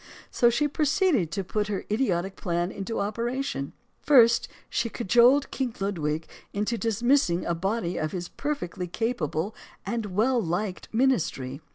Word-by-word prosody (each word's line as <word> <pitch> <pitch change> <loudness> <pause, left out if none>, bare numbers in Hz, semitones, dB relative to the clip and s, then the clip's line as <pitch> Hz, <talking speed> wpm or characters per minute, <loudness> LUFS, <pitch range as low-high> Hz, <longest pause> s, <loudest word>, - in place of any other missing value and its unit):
So 240 - +4
she 295 +5 +1
proceeded 295 - +2
to 195 - -1
put 210 +3 -1
her 200 -2 -3
idiotic 195 -5 0
plans 175 0 -2
into 200 +3 -4
operation. 230 - -2 0.3
First, 235 -5 +5 0.2
she 235 0 -1
cajoled 240 +6 +4
King 255 -4 -2
Ludwig 160 -6 -2 0.3
into 210 +3 -1
dismissing 230 -4 +2
in - - -7
a 170 - 0
body 190 +1 -1
his 175 +3 -3
perfectly 280 - -4
capable 195 -3 -2 0.3
and 230 -3 -2
well 230 +6 +2
liked 180 +2 -3
ministry. 175 - 0
215 Hz, 140 wpm, -26 LUFS, 175-240 Hz, 0.3 s, First